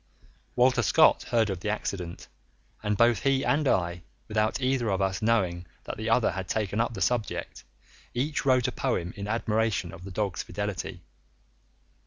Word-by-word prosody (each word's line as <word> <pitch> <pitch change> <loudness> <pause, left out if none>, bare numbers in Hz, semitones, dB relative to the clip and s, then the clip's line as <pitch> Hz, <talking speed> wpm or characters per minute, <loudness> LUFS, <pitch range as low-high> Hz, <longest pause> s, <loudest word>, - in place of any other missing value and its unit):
Walter 125 +1 +4
Scott - - +5
heard 115 -4 +2
of 95 - -4
the 105 - -3
accident, 90 -5 -4 0.5
and 105 -1 -1
both 115 -1 +4
he 135 -1 +2
and 145 0 +2
I, 85 -5 +1 0.3
without 110 +3 0
either 130 -3 +1
of 95 -2 0
us 95 +1 0
knowing 95 -6 +1 0.2
that - - -5
the 110 +1 -3
other 115 +1 +3
had 95 -1 -5
taken 105 0 0
up 120 0 -2
the 95 - -6
subject, 115 +3 -1 0.5
each 145 +5 -1
wrote 130 -2 +3
a - - -1
poem 90 -5 -2
in 100 0 -5
admiration 110 -4 0
of 85 - -10
the 95 - -7
dog's 100 -1 -2
fidelity. 95 -3 -5
105 Hz, 170 wpm, -27 LUFS, 95-120 Hz, 0.5 s, Scott